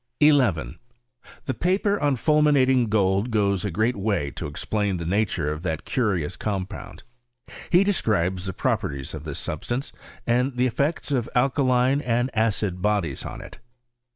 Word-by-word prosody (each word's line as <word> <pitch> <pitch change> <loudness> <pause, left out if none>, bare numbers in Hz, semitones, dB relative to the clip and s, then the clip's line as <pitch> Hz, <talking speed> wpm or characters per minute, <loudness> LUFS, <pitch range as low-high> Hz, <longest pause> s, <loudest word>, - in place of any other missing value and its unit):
1 150 -1 +6 0.2
1. 80 +1 -8 0.7
The 130 - -1
paper 195 - +1
on 145 -2 +2
fulminating 135 -3 +3
gold 100 +1 +2
goes 100 -4 +1
a 105 - -1
great 110 +7 0
'Way 100 -8 -1
to - - -6
explain 100 +6 -2
the 85 - -5
nature 90 -5 0
of 75 +1 -5
that 80 -4 -3
curious 95 - -1
compound 95 -3 -5 0.7
He 180 +2 +5
describes 95 - 0
the 95 - -3
properties 70 -5 -2
of - - -7
this - - -4
substance, 120 - -3 0.3
and 125 +2 +1
the 125 - +3
effects 140 +5 -1
of 125 -5 0
alkaline 130 +1 +2
and 120 0 -1
acid 105 -4 0
bodies 105 0 -1
on - - -7
it. - - -12
110 Hz, 155 wpm, -24 LUFS, 95-130 Hz, 0.7 s, 1